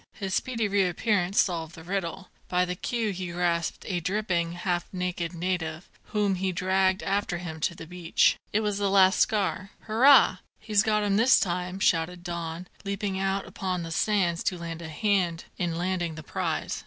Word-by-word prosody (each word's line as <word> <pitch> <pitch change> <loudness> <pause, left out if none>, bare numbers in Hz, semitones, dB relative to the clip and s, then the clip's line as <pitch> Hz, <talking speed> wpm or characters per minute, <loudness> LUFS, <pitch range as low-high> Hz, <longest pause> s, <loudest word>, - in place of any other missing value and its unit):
His 195 -2 -4
speedy 230 -2 0
reappearance 195 0 +1
solved 165 -3 0
the 160 - -11
riddle. 190 +1 -4 0.2
By 180 0 +2
the 180 - -3
queue 225 +3 -2
he 180 -2 -5
grasped 170 -1 -1
a 180 -3 -1
dripping, 175 -2 -1
half 175 0 -2
naked 180 -2 -3
native, 170 -1 -3 0.2
whom 205 -2 0
he 190 0 -1
dragged 185 +1 +1
after 195 -2 0
him 165 -2 -6
to 170 - -1
the 165 - -9
beach. 175 0 +2 0.2
It 215 - +2
was 210 -2 -1
the 200 -1 +1
lascar. 195 0 +3
"Hurrah! 235 -2 +6 0.2
he's 215 -2 +2
got 210 -1 +1
him 200 -1 +2
this 235 +4 +6
time," 180 0 -2
shouted 175 0 +1
Don, 170 0 -5 0.2
leaping 200 -1 -2
out 195 0 0
upon 185 -2 -3
the 165 - -6
sands 180 -2 +1
to 180 - 0
lend 165 -1 -6
a 160 - -7
hand 180 -1 0
in 175 -2 -1
landing 175 -1 -1
the 155 - -8
prize. - - -2
185 Hz, 175 wpm, -27 LUFS, 170-200 Hz, 0.2 s, Hurrah